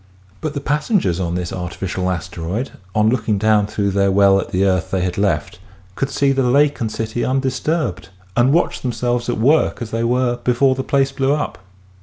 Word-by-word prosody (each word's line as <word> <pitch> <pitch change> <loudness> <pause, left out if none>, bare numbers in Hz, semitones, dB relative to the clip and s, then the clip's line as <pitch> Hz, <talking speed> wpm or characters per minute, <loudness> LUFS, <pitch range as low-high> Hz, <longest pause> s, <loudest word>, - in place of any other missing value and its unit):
But 155 -1 -3
the 140 - -2
passengers 150 - 0
on 85 -2 -2
this 90 -1 -3
artificial 90 +1 -3
asteroid 90 - -4 0.2
on 105 0 +4
looking 110 -4 0
down 105 0 +3
through 100 -1 -1
their 100 0 +2
well 100 0 +5
at - - -4
the 95 +2 +1
earth 95 -2 +1
they 95 - -1
had 90 -1 -2
left 95 -5 -1 0.3
could 135 +7 -2
see 140 0 +1
the 135 0 +1
lake 140 +3 +2
and 110 -2 -1
city 110 +2 -3
undisturbed 130 - -1 0.3
and 120 +2 +4
watch 170 +4 +1
themselves 120 -1 -1
at - - -1
work 140 +8 +2
as 115 -2 -6
they 115 +1 -1
were 120 +1 +1
before 125 +2 +2
the 130 0 -3
place 135 0 +1
blew 135 0 +1
up. 150 -8 -3
115 Hz, 195 wpm, -19 LUFS, 95-135 Hz, 0.3 s, well